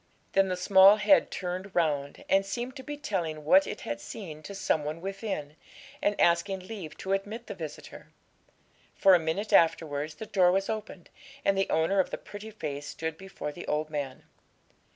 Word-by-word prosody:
Then 195 0 +4
the 185 - -1
small 190 +2 +7
head 215 +7 +4
turned 185 +1 -5
round, 145 -4 0
and 195 0 +4
seemed 240 +6 -4
to - - -7
be 295 +2 -6
telling 170 - -3
what 190 +5 +6
it - - -6
had 115 0 -4
seen 155 - -8
to 200 +5 -8
some 160 -5 0
one 155 +2 -4
within, 195 -6 -5 0.4
and 205 0 0
asking 180 +3 +2
leave 185 -5 -8
to 195 - -2
admit 210 +4 -3
the - - -6
visitor; 160 -6 -9 0.9
for 195 -1 +6
a 180 - +6
minute 165 +7 -2
afterwards 155 -2 +2
the 220 - -7
door 185 -4 +4
was 195 +3 0
opened, 210 -5 -7 0.3
and 195 - +4
the 195 0 0
owner 165 +5 +2
of 190 - +2
the - - -4
pretty 205 +1 -9
face 145 -9 -5
stood 160 -1 -4
before 190 -4 -7
the 175 - -9
old 155 +1 -1
man. 140 -3 -4
185 Hz, 185 wpm, -29 LUFS, 155-200 Hz, 0.9 s, small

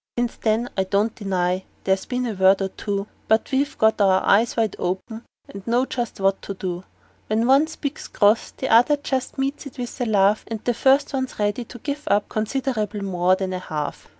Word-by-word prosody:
Since 240 0 -1
then 225 +2 0
I 190 - +1
don't 205 +3 +1
deny 185 -3 0
but 190 - -22 0.2
there's 190 0 +1
been 250 -1 -1
a 230 - -2
word 190 0 +4
or 195 -1 -1
two; 200 0 -3 0.2
But 220 +1 +2
we've 275 +2 0
got 220 -1 +3
our 190 -1 +4
eyes 225 +5 +3
wide 220 -3 +1
open, 190 +6 -4 0.2
and 195 +1 -10
know 240 +3 +2
just 240 -5 -4
what 195 0 +1
to 200 - -6
do: 180 -1 -5 0.4
When 220 +2 +1
one 275 +5 +5
speaks 300 -2 -5
cross 210 +2 +3
the 265 - -5
other 245 +6 +5
just 265 -2 -3
meets 275 +2 -2
it 275 - -13
with 245 +1 -6
a - - +1
laugh, 205 0 +3
And 225 -1 -4
the 245 - +2
first 270 +5 +3
one's 260 -1 -3
ready 210 +3 -1
to 245 - -11
give 285 +4 -5
up 205 0 +2
considerable 215 -3 -2
more 185 -1 +2
than 190 0 -3
half. 155 -5 -5
220 Hz, 205 wpm, -23 LUFS, 195-250 Hz, 0.4 s, one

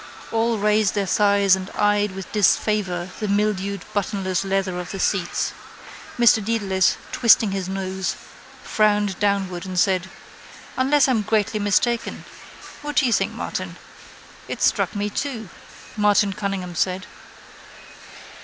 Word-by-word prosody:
All 225 0 +1
raised 210 0 +2
their 200 -1 0
thighs 200 0 +3
and 190 0 -7
eyed 205 -1 +2
with 190 -1 -8
disfavour 195 -3 +1
the 215 - -2
mildewed 200 -1 -1
buttonless 195 -3 -1
leather 195 -2 -1
of 180 - -6
the 195 - -6
seats. - - -1 0.6
Mr 235 -3 +5
Dedalus, 195 -4 +1
twisting 225 -3 +4
his 190 -1 -3
nose, 190 0 -3 0.5
frowned 210 -3 +1
downward 195 -4 0
and 185 -2 -6
said: 190 -1 +1 0.7
—Unless 275 +2 +3
I'm 245 -5 +2
greatly 215 0 0
mistaken. 225 +4 0 0.6
What 295 0 -5
do 275 - +4
you 240 - +2
think, - - +1
Martin? - - -5 0.7
—It - - -4
struck - - +1
me 205 0 -1
too, 225 -5 -4 0.5
Martin 205 -1 +3
Cunningham 190 -3 -4
said. 185 +2 -1
200 Hz, 130 wpm, -22 LUFS, 190-215 Hz, 0.7 s, Mr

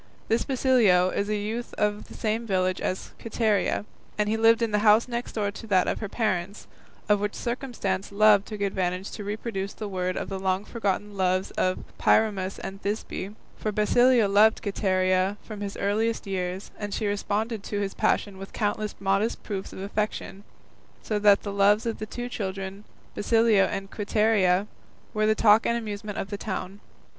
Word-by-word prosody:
This 225 +1 +2
Basilio 235 -9 +3
is 200 +1 -1
a 215 - +1
youth 220 +4 -4
of 210 0 -1
the - - -12
same 225 +1 -2
village 185 -2 0
as 185 - -3
Quiteria, 220 -3 0 0.3
and 210 -1 +1
he 215 - +1
lived 225 +1 +4
in 225 - 0
the 210 - +2
house 215 +2 +5
next 240 0 -4
door 205 -2 -1
to 225 +2 -10
that 190 -3 +3
of - - -1
her 215 - -4
parents, 200 -3 -2 0.4
of 210 -1 +4
which 205 0 -2
circumstance 235 -7 -3
Love 205 0 +5
took 210 0 -7
advantage 190 -1 -1
to 210 - -6
reproduce 205 -1 -4
to - - -24
the 210 - -2
word 185 -2 -2
the 195 -1 -4
long 190 +1 0
forgotten 205 -2 -2
loves 185 0 +1
of 185 0 -1 0.2
Pyramus 195 -3 +2
and 195 +1 -7
Thisbe; 205 -1 -4 0.2
for 215 - -2
Basilio 235 +2 +4
loved 210 +3 +4
Quiteria 185 -1 +1
from 215 -2 -8
his 200 -1 -5
earliest 220 +4 0
years, 185 -1 -3
and 205 -1 -3
she 220 - -2
responded 210 +2 -1
to 205 0 -3
his 200 -1 -2
passion 195 -2 0
with 195 - -9
countless 210 0 -1
modest 195 +3 0
proofs 195 -3 -5
of - - -10
affection, 205 -1 -3 0.6
so 210 -1 -1
that 205 -1 +5
the 200 - -4
loves 205 +3 +4
of 230 -1 -2
the 215 - -5
two 245 +3 -5
children, 195 -3 -5 0.3
Basilio 225 -2 +3
and 195 0 -4
Quiteria, 205 -3 +2 0.5
were 215 -1 +1
the 215 - +3
talk 215 +1 +5
and 235 - +2
the - - 0
amusement 210 -2 -6
of 195 - -4
the 205 - -3
town. 195 -2 -5
205 Hz, 185 wpm, -26 LUFS, 195-220 Hz, 0.6 s, house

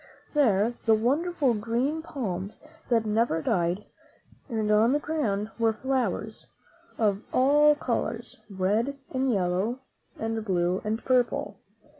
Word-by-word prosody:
There 230 -6 +3
were 220 - +6
wonderful 280 +4 +1
green 235 +8 -1
palms 205 - -5 0.3
that 230 -2 +2
never 215 -6 +1
died, 175 +4 0 0.6
and 220 -3 0
on 220 +4 +4
the 295 - +2
ground 225 -10 -2
were 225 -1 +3
flowers 225 -4 -2 0.5
of 205 -3 +1
all 295 +3 +5
colors, 235 -3 -3
red 210 +8 0
and 260 0 +1
yellow 195 +5 0 0.4
and 225 0 -2
blue 180 -2 0
and 220 +2 -3
purple. 245 -6 +1
225 Hz, 120 wpm, -27 LUFS, 205-260 Hz, 0.6 s, were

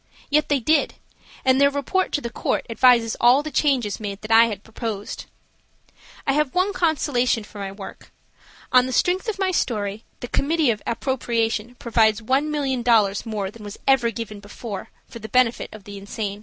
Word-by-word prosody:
Yet 300 +1 +2
they 285 -2 +2
did, 295 +5 +1 0.5
and 260 +1 +4
their 280 - +6
report 285 +7 -1
to 290 - 0
the 235 - -5
court - - -1
advises 235 -1 +4
all 250 +4 +5
the 310 - -6
changes 260 -7 +1
made 200 -2 -5
that 215 +1 -7
I 225 +1 +8
had 210 -3 -5
proposed. 220 -2 -6 1.0
I 275 - +2
have 300 0 0
one 375 +3 +2
consolation 275 - +1
for 205 0 -12
my 195 -1 -4
work–on 215 +5 -3
the 260 - -4
strength 360 - +1
of 435 -3 -2
my 385 -1 0
story 210 - -2 0.2
the 245 - -5
committee 300 +1 +1
of 215 - -4
appropriation 235 -2 -1
provides 220 -3 +2
$1,000,000 250 -5 +1
more 205 -3 -3
than 225 0 -13
was 205 0 -8
ever 265 -3 +4
before 210 -1 -7
given, - - -17 0.2
for 235 - -10
the 220 0 -8
benefit 250 0 +2
of 215 -2 -11
the 200 0 -9
insane. 200 0 -5
235 Hz, 175 wpm, -23 LUFS, 215-280 Hz, 1.0 s, I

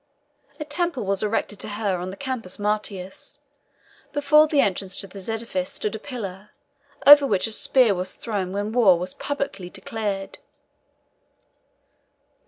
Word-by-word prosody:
A 300 - -4
temple 320 -2 -1
was 195 0 0
erected 210 -1 -1
to - - -3
her 205 -3 -1
on 180 +1 -4
the 190 - -8
Campus 255 -9 -4
Martius. 210 +5 -3 0.8
Before 300 +2 +5
the 300 -2 +1
entrance 190 -4 0
to - - -2
this 195 +1 -9
edifice 235 +5 -2
stood 215 -7 -3
a 220 - -4
pillar, 210 -6 -7 0.6
over 290 0 +10
which 195 -6 +1
a 225 - -2
spear 240 0 +4
was 185 0 -4
thrown 200 -5 -3
when 205 +2 -2
war 220 -7 +5
was 180 +2 -4
publicly 275 -11 -4
declared. 195 0 -4
210 Hz, 145 wpm, -24 LUFS, 195-270 Hz, 0.8 s, over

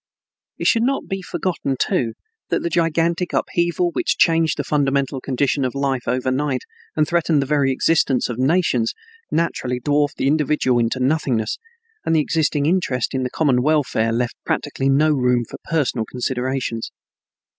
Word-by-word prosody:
It - - -4
should 230 - +4
not 270 +3 0
be 195 0 -3
forgotten, 175 -6 -2
too, 115 -2 0 0.4
that - - 0
the 170 - -2
gigantic 170 +1 +1
upheaval 175 0 0
which - - 0
changed 165 -1 +3
the 145 - -1
fundamental 140 -2 0
condition 135 +1 0
of 130 +1 -2
life 135 -2 -1
overnight 130 +2 0 0.3
and 155 -1 +2
threatened 170 -3 +2
the 140 - 0
very 140 -1 +2
existence 135 -1 +2
of 120 0 -5
nations 130 -5 +1 0.3
naturally 130 -6 -1
dwarfed 145 +2 +1
the - - -1
individual 145 -3 +2
into 120 +2 0
nothingness, 130 -4 0 0.4
and 165 - +1
the - - +4
existing 150 -1 +1
interest 150 -8 0
in 130 - -1
the 125 - -1
common 130 -3 +2
welfare 140 -6 +1
left 120 +1 -1
practically 135 -2 -1
no 150 +3 +4
room 125 -4 +2
for - - -9
personal 135 -8 0
considerations. 125 -2 -2
140 Hz, 155 wpm, -21 LUFS, 125-160 Hz, 0.4 s, should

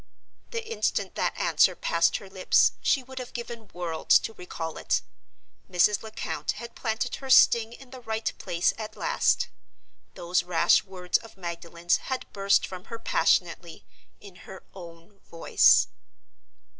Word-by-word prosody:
The 460 -1 -5
instant 460 - -1
that - - -2
answer - - +3
passed 170 0 +1
her 195 - -12
lips 190 -1 +3
she 270 - +2
would 260 +1 -9
have 250 -1 -8
given 235 -3 -7
worlds 170 -2 +2
to 225 - -5
recall 165 -4 -7
it. - - 0 0.7
Mrs. 190 +3 +3
Lecount 220 -1 -4
had 235 +2 -9
planted 220 -1 -3
her 270 - -9
sting 230 -3 +6
in 250 +1 -14
the 260 -1 -10
right 220 -1 -3
place 170 0 0
at 215 -1 -7
last. - - +1 0.7
Those 175 +1 0
rash 175 -2 +3
words 180 -2 -1
of 225 -3 -15
Magdalen's 170 -1 -2
had 260 -1 -5
burst 200 0 +2
from 185 -1 -9
her 230 - -7
passionately, 170 -6 0 0.3
in 195 -3 -14
her 190 - -10
own 170 +1 -13
voice. 165 - +4
195 Hz, 145 wpm, -26 LUFS, 175-230 Hz, 0.7 s, sting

